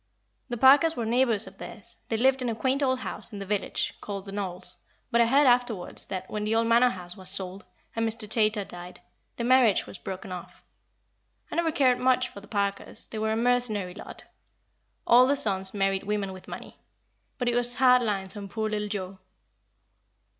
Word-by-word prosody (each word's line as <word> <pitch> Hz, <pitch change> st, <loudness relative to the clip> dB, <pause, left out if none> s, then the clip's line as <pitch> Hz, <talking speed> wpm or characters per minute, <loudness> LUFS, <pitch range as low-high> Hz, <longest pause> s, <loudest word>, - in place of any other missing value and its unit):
The 240 Hz, -, -4 dB
Parkers 285 Hz, +6 st, +5 dB
were 235 Hz, -3 st, -3 dB
neighbours 235 Hz, -2 st, +1 dB
of -, -, -15 dB
theirs; 235 Hz, +3 st, -10 dB
they 225 Hz, -, -1 dB
lived 265 Hz, +3 st, +2 dB
in 250 Hz, -, -2 dB
a 225 Hz, -, -3 dB
quaint 260 Hz, +5 st, -1 dB
old 260 Hz, -2 st, 0 dB
house -, -, +4 dB
in 210 Hz, -, -7 dB
the 200 Hz, -, -6 dB
village, 200 Hz, 0 st, -2 dB
called 200 Hz, -1 st, -6 dB
The 195 Hz, -, -9 dB
Knolls, 185 Hz, -2 st, -3 dB, 0.3 s
but 235 Hz, 0 st, +3 dB
I 230 Hz, -, +3 dB
heard 280 Hz, +4 st, +4 dB
afterwards 245 Hz, -7 st, 0 dB
that, 185 Hz, 0 st, -6 dB
when 210 Hz, 0 st, -5 dB
the 215 Hz, +1 st, -1 dB
old 230 Hz, 0 st, +2 dB
Manor 235 Hz, +2 st, +4 dB
House 180 Hz, -5 st, -9 dB
was 185 Hz, -2 st, +3 dB
sold, 190 Hz, +1 st, +4 dB, 0.3 s
and 225 Hz, 0 st, 0 dB
Mr. 220 Hz, -1 st, -2 dB
Chaytor 215 Hz, -1 st, 0 dB
died, 175 Hz, +1 st, -10 dB, 0.4 s
the 235 Hz, -, -3 dB
marriage 245 Hz, -4 st, +3 dB
was -, -, -11 dB
broken 190 Hz, 0 st, -8 dB
off. 180 Hz, -1 st, -10 dB, 0.9 s
I -, -, -5 dB
never 335 Hz, -1 st, 0 dB
cared 255 Hz, -4 st, +2 dB
much 255 Hz, 0 st, +1 dB
for 200 Hz, -, -12 dB
the 205 Hz, -, -16 dB
Parkers; 200 Hz, -3 st, -4 dB
they 220 Hz, -, -5 dB
were 220 Hz, 0 st, -1 dB
a -, -, 0 dB
mercenary 230 Hz, -6 st, 0 dB
lot. -, -, -11 dB, 0.8 s
All 250 Hz, +2 st, +6 dB
the 285 Hz, -, +2 dB
sons 190 Hz, -6 st, +5 dB
married 195 Hz, -1 st, -1 dB
women 200 Hz, -2 st, -3 dB
with 185 Hz, -, -13 dB
money. -, -, -10 dB, 0.6 s
But 245 Hz, -, -3 dB
it 240 Hz, -, +1 dB
was 245 Hz, 0 st, -1 dB
hard 250 Hz, -1 st, +4 dB
lines 200 Hz, -3 st, -3 dB
on 200 Hz, -1 st, -8 dB
poor 220 Hz, 0 st, -3 dB
little 210 Hz, -1 st, -2 dB
Joa." 195 Hz, -2 st, -6 dB
220 Hz, 200 wpm, -26 LUFS, 195-245 Hz, 0.9 s, All